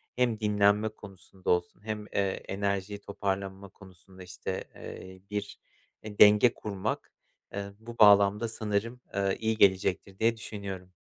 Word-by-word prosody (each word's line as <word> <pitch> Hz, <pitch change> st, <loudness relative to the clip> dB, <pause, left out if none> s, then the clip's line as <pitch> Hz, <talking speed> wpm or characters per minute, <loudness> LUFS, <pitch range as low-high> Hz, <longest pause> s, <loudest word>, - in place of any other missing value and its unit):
hem 120 Hz, -3 st, +1 dB
dinlenme 105 Hz, 0 st, +3 dB
konusunda 95 Hz, -3 st, -10 dB
olsun 90 Hz, +2 st, 0 dB
hem, 105 Hz, -1 st, -4 dB
eee, -, -, +1 dB, 0.3 s
enerjiyi 100 Hz, 0 st, -2 dB
toparlanma 100 Hz, -1 st, -4 dB
konusunda, 95 Hz, -1 st, -15 dB
işte, 90 Hz, +1 st, -5 dB
eee, 95 Hz, 0 st, -10 dB
bir 105 Hz, -1 st, -4 dB, 0.5 s
denge 105 Hz, +2 st, +6 dB
kurmak, 105 Hz, 0 st, -4 dB, 0.4 s
eee, 100 Hz, 0 st, -4 dB
bu 115 Hz, +1 st, -10 dB
bağlamda 105 Hz, +1 st, +6 dB
sanırım, 110 Hz, +2 st, -2 dB
aaa, 100 Hz, -1 st, +1 dB
iyi 110 Hz, 0 st, -1 dB
gelecektir 95 Hz, -1 st, +2 dB
diye 115 Hz, +1 st, +2 dB
düşünüyorum. 95 Hz, -4 st, -7 dB
100 Hz, 125 wpm, -29 LUFS, 95-105 Hz, 0.5 s, denge